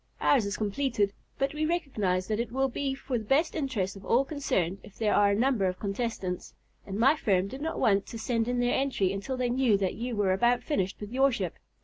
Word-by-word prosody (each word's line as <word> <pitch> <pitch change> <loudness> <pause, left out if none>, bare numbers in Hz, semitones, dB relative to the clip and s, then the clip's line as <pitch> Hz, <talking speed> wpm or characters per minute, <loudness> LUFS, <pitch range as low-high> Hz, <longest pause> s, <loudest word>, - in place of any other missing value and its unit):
Ours 245 -8 +3
is 200 - -3
completed, 210 -1 0 0.2
but 275 +2 0
we 305 0 -2
recognize 225 - 0
that 215 0 -1
it 235 -1 -2
will 265 +2 +1
be 270 +1 -2
for 265 -2 -3
the - - -7
best 275 +9 +2
interests 250 - -2
of 195 - -11
all 245 +7 +3
concerned 195 - -1
if 195 - -15
there 215 -2 +1
are 205 0 +5
a 200 - +2
number 240 -2 +2
of 185 0 -1
contestants, 195 -3 -3 0.3
and 195 0 -4
my 265 +7 +5
firm 195 -10 +1
did 265 +7 -8
not 320 +2 -3
want 200 -1 +2
to 230 - -7
send 225 0 -1
in 245 0 0
their 245 0 +2
entry 255 -9 +1
until 205 +7 -4
they 250 -1 0
knew 245 -5 +3
that 195 -2 -1
you 240 +1 -4
were 200 -3 +2
about 240 +5 +2
finished 195 - -1
with 210 0 -7
your 270 +2 +4
ship. 250 - -2
230 Hz, 235 wpm, -28 LUFS, 200-270 Hz, 0.3 s, are